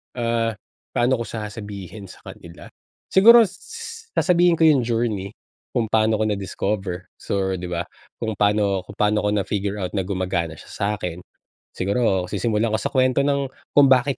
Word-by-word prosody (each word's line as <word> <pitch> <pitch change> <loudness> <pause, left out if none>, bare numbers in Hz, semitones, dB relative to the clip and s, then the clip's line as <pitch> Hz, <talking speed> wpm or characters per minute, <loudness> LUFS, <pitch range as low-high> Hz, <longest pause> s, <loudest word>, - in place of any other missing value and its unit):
Ah, 115 -2 0 0.4
paano 120 +1 +2
ko 115 - -4
sasabihin 105 -2 -7
sa - - -15
kanila? 85 0 -12 0.4
Siguro 230 +4 +8
s 460 - -8
sasabihin 175 -1 +4
ko 165 - +1
yung 140 -7 +4
journey 110 -4 -1 0.4
kung 115 -3 0
paano 110 0 +3
ko 110 - 0
na-discover 95 -2 -3
so 95 -1 -1
di 90 - -5
ba, 85 0 -2 0.3
kung 110 -1 -3
paano 100 -2 +2
kung 105 - -10
paano 105 0 +2
ko 105 - +2
na 100 - +1
figure 100 0 -2
out 90 - -3
na 95 -2 -2
gumagana 90 -4 -2
siya 105 +6 -3
sa'kin. 90 -3 -5 0.5
Siguro, 95 -1 0
sisimulan 110 +1 0
ko 110 - +1
sa - - -1
kwento 130 +1 +3
ng 140 -1 +1 0.3
kung 145 - +9
bakit 130 +1 +3
105 Hz, 165 wpm, -22 LUFS, 95-125 Hz, 0.5 s, kung